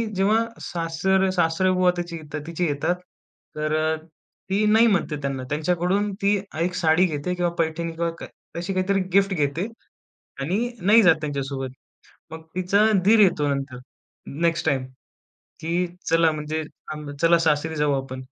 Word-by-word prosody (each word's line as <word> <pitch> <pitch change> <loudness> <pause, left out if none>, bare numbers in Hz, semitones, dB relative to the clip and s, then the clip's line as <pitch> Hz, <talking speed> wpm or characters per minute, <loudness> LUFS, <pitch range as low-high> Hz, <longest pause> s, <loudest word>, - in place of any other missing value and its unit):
जेव्हा 195 +3 +3 0.2
सासर 175 +3 0
सासरेबुवा 180 +2 +3
त्याच्या 175 -1 -4
इथे 160 - -10
येतात, 150 0 -7
तिची 170 +1 -1
येतात. 145 +5 0 0.6
तर 155 +1 0 0.5
ती 200 +3 +2
नाही 225 +2 +6
म्हणते 195 -8 +1
त्यांना. 135 -2 -3
त्यांच्याकडून 180 +6 0
ती 200 +1 +3 0.3
एक 180 +1 0
साडी 175 0 +3
घेते 155 +1 -2
किंवा 175 -1 0
पैठणी 165 +1 -1
किंवा 170 +1 -2
काय - - -7 0.3
तशी 175 +3 -3
काहीतरी 190 +1 +1
गिफ्ट 195 0 +4
घेते 155 +4 -1 0.7
आणि 195 - 0
नाही 210 +5 +6
जात 175 -3 +6
त्यांच्यासोबत. 140 -3 -3 0.6
मग 160 - -7
तिचा 185 +3 +3 0.2
दीर 220 +2 +6
येतो 175 -8 +4
नंतर 135 -2 -5 0.6
नेक्स्ट 170 -1 +1
टाईम, 135 -4 +1 0.7
की 170 +3 -1 0.2
"चला 165 -1 +4
म्हणजे 155 +1 -3 0.3
आम 150 -1 -8
चला 170 0 +5
सासरी 160 0 +1
जाऊ 150 -1 +1
आपण" 130 -1 -8
165 Hz, 145 wpm, -24 LUFS, 150-185 Hz, 0.7 s, नाही